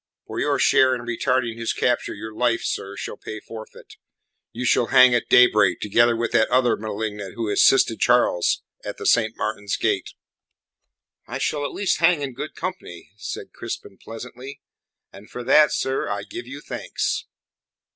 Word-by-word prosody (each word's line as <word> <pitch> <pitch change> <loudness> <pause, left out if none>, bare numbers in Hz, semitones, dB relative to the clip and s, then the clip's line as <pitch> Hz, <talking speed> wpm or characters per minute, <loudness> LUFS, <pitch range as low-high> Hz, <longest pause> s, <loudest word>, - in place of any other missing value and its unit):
For - - -6
your - - +1
share 130 -1 +4
in 120 - -6
retarding 120 0 -1
his 115 - -1
capture 120 -1 0
your 110 +1 -8
life, 120 0 +1
sir, 100 +1 -4
shall - - -6
pay 110 - -7
forfeit. 110 0 -12 0.5
You 125 +2 -5
shall 120 -1 +3
hang 130 -1 +6
at 120 - 0
daybreak 105 -7 +5
together 120 +3 +3
with 115 0 -2
that 110 - +3
other 125 -1 +3
malignant 105 -2 -5
who 115 -3 -2
assisted 115 +1 +4
Charles 120 -8 +2 0.2
at - - -6
the - - -7
Saint 115 -1 +2
Martin's 105 -2 -3
Gate." - - -1 1.1
"I - - -4
shall 145 -1 -1
at - - -3
least 200 - -1
hang 165 -3 +3
in 135 -2 -4
good 150 +5 -7
company," 180 - -7
said 105 - -7
Crispin 95 - -7
pleasantly, 125 +4 -9 0.5
"and 100 +2 -14
for 125 - -7
that, 150 +4 +5
sir, 135 0 -1
I - - -3
give 350 +4 -8
you - - -8
thanks." - - -3
120 Hz, 165 wpm, -23 LUFS, 110-130 Hz, 1.1 s, hang